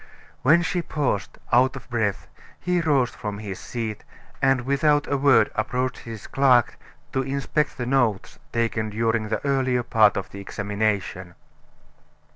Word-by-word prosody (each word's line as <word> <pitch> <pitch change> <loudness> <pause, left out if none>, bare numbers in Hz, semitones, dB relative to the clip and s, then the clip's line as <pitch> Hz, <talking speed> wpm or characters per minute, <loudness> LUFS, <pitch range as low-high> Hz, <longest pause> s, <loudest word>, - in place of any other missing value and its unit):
When 165 +6 +5
she 175 +1 -1
paused, 140 - -2 0.2
out 130 +3 +4
of 135 - -10
breath, 110 -5 -1 0.3
he 180 -1 0
rose 140 -6 +2
from 105 -1 -6
his 100 -3 -6
seat, 110 -3 -5 0.4
and 135 -2 +3
without 145 +3 +2
a 145 - -1
word 135 -6 +4
approached 125 +3 -2
his 110 -3 -9
clerk 130 -4 +3 0.3
to 130 - +1
inspect 140 +3 -1
the 120 - -3
notes 120 -6 0
taken 115 -2 -1
during 110 0 0
the 110 - -2
earlier 130 -3 +1
part 110 -3 +4
of 100 - -4
the 100 - -8
examination. 100 -3 -2
120 Hz, 145 wpm, -24 LUFS, 110-135 Hz, 0.4 s, When